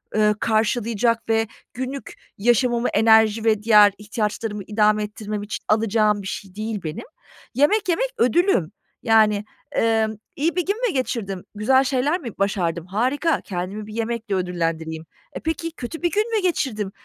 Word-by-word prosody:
ııı, 210 0 +3
karşılayacak 225 +1 0
ve 225 0 +2 0.3
günlük 260 +2 -5 0.2
yaşamımı 240 +2 +2
enerji 220 0 +4
ve 215 -2 +2
diğer 210 -2 +6
ihtiyaçlarımı 210 0 -3
idame 210 +1 +2
ettirmem 210 -1 -5
için 210 - -6
alacağım 215 -1 +2
bir 190 - -7
şey 195 -1 -7
değil 215 -1 -3
benim. 155 0 -5 0.5
Yemek 365 +9 +3
yemek - - +1
ödülüm. 250 - +2 0.3
Yani, 215 -2 +4 0.3
emm, 220 -1 +1 0.2
iyi 325 +4 0
bir 360 - 0
gün 415 +5 -2
mü 385 - -2
geçirdim? 205 -8 -3
Güzel 260 +6 +3
şeyler 275 +6 0
mi 255 -9 -6
başardım? 175 -4 -1
Harika. 260 - 0
Kendimi 195 +3 -5
bir 215 - -9
yemekle 230 -2 -2
ödüllendireyim. 165 -3 -2 0.3
E, - - -5
peki 325 +1 -3
kötü 320 +2 -7
bir 345 - +1
gün 430 +3 0
mü 430 - +2
geçirdim? 220 - -1
220 Hz, 150 wpm, -22 LUFS, 205-255 Hz, 0.5 s, diğer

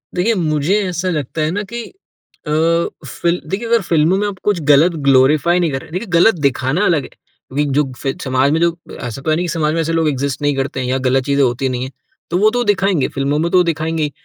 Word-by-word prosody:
देखिए, 185 +6 +2
मुझे 155 +1 0
ऐसा 180 +1 -2
लगता 155 -2 -3
है 155 +1 0
ना 205 +3 -2
कि 235 - -4 0.6
अ, - - -2 0.5
फ़िल 170 +1 -1
देखिए 210 +5 -3
अगर 230 0 +3
फ़िल्मों 170 0 +2
में 205 +1 0
आप 200 -2 -5
कुछ 205 -4 +1
गलत 150 +5 +6 0.2
ग्लोरिफाई 145 +6 +4
नहीं 170 -3 +1
कर 135 -1 -3
रहे - - -15
देखिए 185 +7 -4
गलत 175 +5 +5
दिखाना 140 +5 +1
अलग 155 -5 +2
है। - - -10 0.4
विग 145 +1 0
जो 150 - +3
फ़े 135 +1 -2
समाज 130 +1 +1
में 160 - +1
जो 170 0 +2 0.2
ऐसा 120 +1 -6
तो 145 - -3
है 155 - +3
नहीं 175 - -1
कि 175 - -4
समाज 155 -2 0
में 165 - -1
ऐसे 165 +1 -2
लोग 165 -1 +1
इग्ज़िस्ट 140 -1 -3
नहीं 145 -1 +1
करते 135 0 -2
हैं 125 - -2
या 130 +1 0
गलत 130 0 +2
चीज़ें 140 0 +1
होती 125 +1 0
नहीं 125 0 -3
है। 130 - -6 0.4
तो 175 - +1
वो 215 +3 +4
तो 245 +1 0
दिखाएँगे, 195 - +1
फ़िल्मों 140 +2 -1
में 170 +2 0
तो 180 -1 +5
दिखाएँगे 160 -1 -1
ही। 150 - -2
155 Hz, 250 wpm, -17 LUFS, 140-180 Hz, 0.6 s, गलत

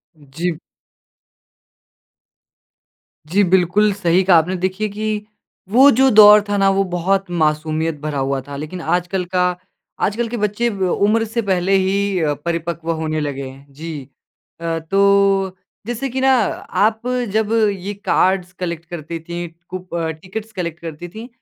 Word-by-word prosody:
जी। 155 +4 -4 2.8
जी, 195 +6 +3
बिल्कुल। 190 +3 +3
सही 185 -2 +2
कहा 180 -2 +6
आपने 180 +4 +1
देखिए 185 +4 -1
कि, 210 0 -3 0.4
वो 260 +7 +7
जो 265 0 +6
दौर 210 -1 +8
था 205 - +1
ना 195 0 +4
वो 195 - +3
बहुत 190 +3 +1
मासूमियत 155 -1 0
भरा 150 -2 -3
हुआ 135 0 -1
था। 145 - -7
लेकिन 155 +5 -6
आजकल 180 +3 -1
का 180 0 +3 0.6
आजकल 230 +4 -1
के 240 +1 -4
बच्चे 210 +3 0
ब 200 -4 -3
उम्र 220 +3 +2
से 230 +2 -2
पहले 190 -2 0
ही 195 0 0
अ, 155 -3 +1
परिपक्व 170 0 -2
होने 160 -1 -2
लगे 140 -2 -3
हैं, 135 +1 -13
जी। 155 0 -6 0.6
अ, 165 -1 -2
तो, 195 +2 +2 0.3
जैसे 245 +3 -3
कि 260 +2 -3
ना 265 0 +4 0.6
आप 220 0 -3 0.3
जब 220 0 +1 0.2
ये 195 +1 -5
कार्ड्स 185 -1 +2
कलेक्ट 170 -2 -4
करती 165 -1 -6
थीं, 170 +1 -6 0.2
कुप 185 -1 -7
अ, 165 -1 -1
टिकट्स 195 +8 -8
कलेक्ट 170 -4 -4
करती 165 0 -7
थीं, 220 +5 -9
185 Hz, 150 wpm, -19 LUFS, 165-205 Hz, 2.8 s, दौर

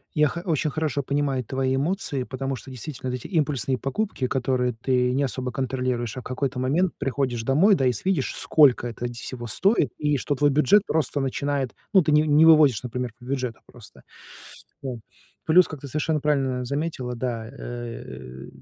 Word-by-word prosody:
Я 150 0 +4
хо 170 +4 -5
очень 155 -2 0
хорошо 150 -2 -1
понимаю 140 -2 0
твои 130 +2 -1
эмоции, 145 -2 -1
потому 135 +1 -4
что 130 - -10
действительно 130 0 -5
вот 125 - -2
эти - - -9
импульсные 140 - 0
покупки, 135 - -2
которые 125 -2 0
ты 125 +2 +1
не 140 +2 +1
особо 130 -1 -2
контролируешь, 125 -2 -2
а - - -4
в - - -19
какой-то 130 0 -3
момент 160 +8 +1
приходишь 135 -4 -1
домой, 160 - +4
да, 135 - 0
и 125 - +4
с 120 - -7
видишь, 185 -8 0
сколько 135 -5 +4
это 120 +1 -5
нь 120 - -7
всего 120 0 -7
стоит, 175 - +2
и 150 -1 +1
что 145 +3 -1
твой 145 +1 +3
бюджет 150 +8 +4
просто 150 -2 0
начинает, 140 0 -2 0.2
ну, 190 - +7
ты 155 - 0
ни 150 0 +5
не 155 +1 +5
выводишь, 150 -8 +6
например, 125 -1 -4
по 120 - -14
бюджету 130 -3 -3
просто 120 -4 -15 0.8
там. 125 -4 -5 0.5
Плюс, 175 +3 +6
как 155 - -7
ты 140 - -8
совершенно 155 +2 -1
правильно 135 -4 0
заметила, 140 -2 -3
да, 115 -2 -3
э, - - -10
э, 120 - -8
135 Hz, 190 wpm, -24 LUFS, 125-150 Hz, 0.8 s, ну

